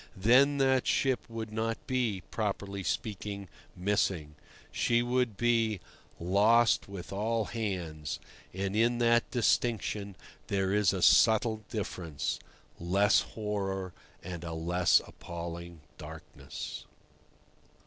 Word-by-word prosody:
Then 130 +8 +5
that 130 -2 +3
ship 130 -3 +2
would 110 -1 -5
not 115 +1 -2
be, 120 -8 -1
properly 100 -2 -2
speaking, 100 0 -3 0.3
missing. 90 -5 0 0.4
She 120 0 +2
would 120 -3 0
be 115 -3 +2 0.4
"lost 105 +6 +3
with 100 -1 -7
all 110 +2 0
hands," 90 -10 -4 0.3
and 95 +2 -3
in 120 +2 +3
that 120 0 +3
distinction 110 -4 0 0.3
there 95 -1 0
is 105 -4 +4
a - - -2
subtle 110 0 +5
difference—less 90 +1 -1 0.2
horror 95 -4 -2 0.3
and 85 -1 -6
a 85 -1 -5
less 85 0 +3
appalling 85 -1 -8 0.2
darkness. 80 +1 -8
100 Hz, 105 wpm, -30 LUFS, 90-115 Hz, 0.4 s, Then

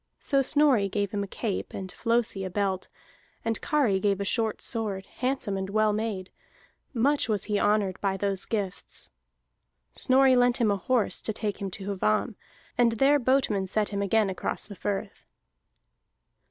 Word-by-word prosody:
So 275 -2 +2
Snorri 270 -7 +3
gave 200 0 -1
him 205 - -1
a - - -5
cape, 205 0 -4
and 190 -1 -5
Flosi 230 -4 0
a 185 - -3
belt, 190 0 -1 0.6
and 225 -1 -1
Kari 255 -11 +2
gave 200 0 +1
a 200 - -2
short 220 +1 0
sword, 205 -5 -2
handsome 255 -6 -1
and 190 0 -3
well 215 +1 +2
made; 210 -4 -3 0.6
much 275 +2 +2
was 210 -3 0
he 205 -1 0
honored 205 -3 +1
by 195 -1 0
those 195 -1 -2
gifts. 200 -5 -4 0.8
Snorri 260 0 +4
lent 245 0 +4
him 225 -4 +2
a - - +2
horse 245 +2 0
to - - -2
take 210 -1 -3
him 195 - -2
to 200 +1 -4
Hvamm, 105 - +1 0.5
and 235 -1 +5
there 275 +5 +4
boatmen 250 -7 +1
set 210 +2 0
him 200 -1 -2
again 200 0 +2
across 185 - -3
the 205 - -10
firth. 195 +2 -4
210 Hz, 165 wpm, -27 LUFS, 195-235 Hz, 0.8 s, and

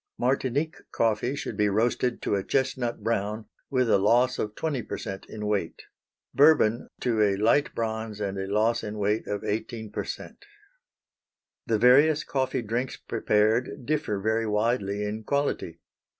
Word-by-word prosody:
Martinique 135 +4 0
coffee 115 +4 0
should 130 - -5
be 105 0 +2
roasted 120 +3 0
to - - 0
a 100 -1 0
chestnut 130 -4 -1
brown, 110 -1 -1 0.2
with 130 -3 +1
a 110 - +4
loss 120 +5 +3
of 105 0 -3
20 150 -6 -2
percent 95 -2 -6
in 105 -1 -6
weight; 105 -5 -2 0.5
Bourbon 140 -6 +4
to 115 -3 +1
a 100 -2 +3
light 115 +8 +2
bronze 110 -2 -3
and 100 -2 -2
a 95 - -3
loss 110 +4 +1
in 105 0 -5
weight 105 +2 0
of 105 0 -3
18 110 0 -4
percent. 105 - -6 1.2
The 115 - +2
various 145 +7 +5
coffee 130 -2 -1
drinks 120 +4 -2
prepared 110 +2 0
differ 145 -9 -1
very 110 +2 0
widely 105 -1 0
in 105 +2 -4
quality. 140 - -1
110 Hz, 150 wpm, -27 LUFS, 105-125 Hz, 1.2 s, various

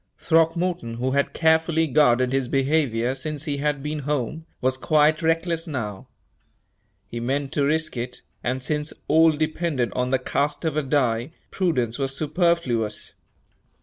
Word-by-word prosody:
Throckmorton, 165 -5 +1
who 125 +3 -1
had 140 +1 +1
carefully 160 0 +2
guarded 130 -4 +3
his 135 -2 +1
behavior 135 -3 +1
since 145 +2 -4
he 145 -3 -2
had 145 -1 -1
been 150 +1 -3
home, 150 +3 -3
was 130 +1 +1
quite 155 +3 +3
reckless 165 +1 0
now. 110 -10 -5 1.0
He 120 - -6
meant 135 +3 -2
to 145 - +1
risk 160 +1 0
it, 125 +1 -5 0.2
and 125 +1 -2
since 150 +2 -2
all 160 +1 +6
depended 155 -4 -1
on 125 0 -1
the 130 - +3
cast 145 +5 -1
of 160 -2 0
a 155 - +2
die, 130 -1 0 0.2
prudence 130 - 0
was 135 0 -1
superfluous. 150 - 0
145 Hz, 150 wpm, -24 LUFS, 130-160 Hz, 1.0 s, all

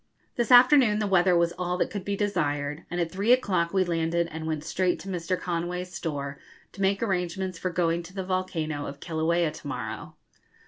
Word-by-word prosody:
This 240 -1 0
afternoon 250 -3 +7
the 215 - 0
weather 185 -2 +4
was 170 0 +2
all 180 0 -1
that - - 0
could 200 -3 -4
be 200 +1 -2
desired, 150 -7 -1
and 175 - -3
at 170 -1 -1
three 200 +5 +1
o'clock 190 -9 +2
we 190 -1 +3
landed 170 -1 0
and 160 0 -5
went 155 -2 -2
straight 180 +2 0
to - - -10
Mr. 180 0 -2
Conway's 180 +1 -3
store 140 -3 -4 0.3
to 195 - -9
make 195 +2 +2
arrangements 185 -2 -2
for 185 - -1
going 170 -1 0
to 175 +3 -13
the 190 -1 -3
volcano 165 -6 -2
of 140 +1 -8
Kilauea 165 0 0
to - - -10
morrow. - - -5
175 Hz, 195 wpm, -27 LUFS, 165-190 Hz, 0.3 s, afternoon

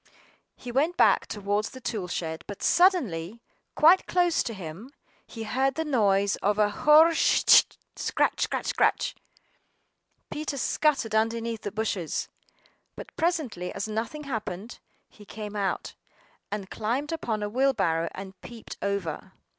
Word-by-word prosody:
HE 245 - -8
went 305 +8 +1
back - - +4
towards 205 +1 -2
the 260 - -11
tool 215 -7 -4
shed, 160 -2 -4
but 205 - -8
suddenly, 235 - +2 0.4
quite 340 +5 +5
close 350 -2 +2
to - - -3
him, 185 +6 -8 0.4
he 225 - -7
heard 265 +4 0
the 320 - -2
noise 200 -8 +2
of 205 +1 0
a 210 -1 +3
hoe - - -10
scr - - -1
r 310 +2 +9
ritch, 330 - +5 0.3
scratch, - - 0
scratch, - - -1
scritch. - - +1 1.2
Peter 300 -1 -4
scuttered 275 -4 +1
underneath 225 +1 0
the 205 - -4
bushes. 205 -6 -2 0.7
But - - -10
presently, 305 - -1
as 200 +2 -4
nothing 225 +8 -4
happened, 220 -4 -5 0.3
he 210 - -17
came 210 0 -8
out, 200 -2 -2 0.6
and 200 -2 -5
climbed 250 +8 -2
upon 225 -10 -2
a - - -1
wheelbarrow, 205 -9 +1
and 190 -1 -9
peeped 235 -2 -10
over. 200 0 -3
220 Hz, 145 wpm, -27 LUFS, 200-275 Hz, 1.2 s, r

